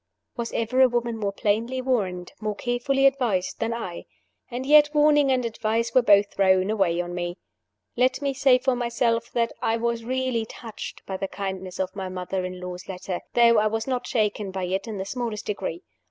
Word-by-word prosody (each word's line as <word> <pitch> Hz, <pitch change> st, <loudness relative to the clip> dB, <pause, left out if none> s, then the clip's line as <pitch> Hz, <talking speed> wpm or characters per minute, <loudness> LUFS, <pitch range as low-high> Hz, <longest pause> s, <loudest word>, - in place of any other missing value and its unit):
Was 235 Hz, -2 st, -4 dB
ever 240 Hz, +3 st, +1 dB
a 260 Hz, -, +7 dB
woman 240 Hz, -1 st, -1 dB
more 205 Hz, -3 st, -2 dB
plainly 225 Hz, +6 st, 0 dB
warned, 195 Hz, -9 st, -1 dB
more 215 Hz, -1 st, -2 dB
carefully 260 Hz, +4 st, 0 dB
advised, 245 Hz, -9 st, +1 dB
than 225 Hz, 0 st, -1 dB
I? 225 Hz, -7 st, -5 dB, 0.4 s
And 250 Hz, +1 st, -4 dB
yet 295 Hz, +1 st, +7 dB
warning 295 Hz, -2 st, +5 dB
and 255 Hz, -2 st, +1 dB
advice 230 Hz, 0 st, -1 dB
were 255 Hz, -, +6 dB
both 205 Hz, -3 st, +4 dB
thrown 190 Hz, 0 st, +3 dB
away 190 Hz, -5 st, +1 dB
on 175 Hz, 0 st, -3 dB
me. 175 Hz, 0 st, -3 dB, 0.6 s
Let 255 Hz, +2 st, +2 dB
me 280 Hz, -1 st, -1 dB
say 265 Hz, -1 st, +5 dB
for 255 Hz, 0 st, 0 dB
myself 235 Hz, -1 st, 0 dB
that 230 Hz, -1 st, 0 dB
I 225 Hz, -, +1 dB
was 235 Hz, 0 st, -1 dB
really 255 Hz, -2 st, -1 dB
touched 225 Hz, -1 st, -9 dB
by 190 Hz, -, -4 dB
the 195 Hz, -, -3 dB
kindness 190 Hz, -2 st, -5 dB
of 190 Hz, 0 st, -2 dB
my 190 Hz, -2 st, -4 dB
mother 185 Hz, 0 st, -3 dB
in 185 Hz, 0 st, -6 dB
law's 180 Hz, +1 st, -7 dB
letter, 185 Hz, -1 st, -4 dB, 0.2 s
though 235 Hz, -2 st, +6 dB
I 215 Hz, -, +3 dB
was 225 Hz, +1 st, -2 dB
not 255 Hz, -2 st, -2 dB
shaken 210 Hz, -3 st, 0 dB
by 190 Hz, 0 st, -4 dB
it 190 Hz, +3 st, -2 dB
in 215 Hz, -2 st, -5 dB
the 190 Hz, -, -3 dB
smallest 230 Hz, -1 st, -4 dB
degree. 190 Hz, -5 st, -4 dB
225 Hz, 195 wpm, -25 LUFS, 190-245 Hz, 0.6 s, a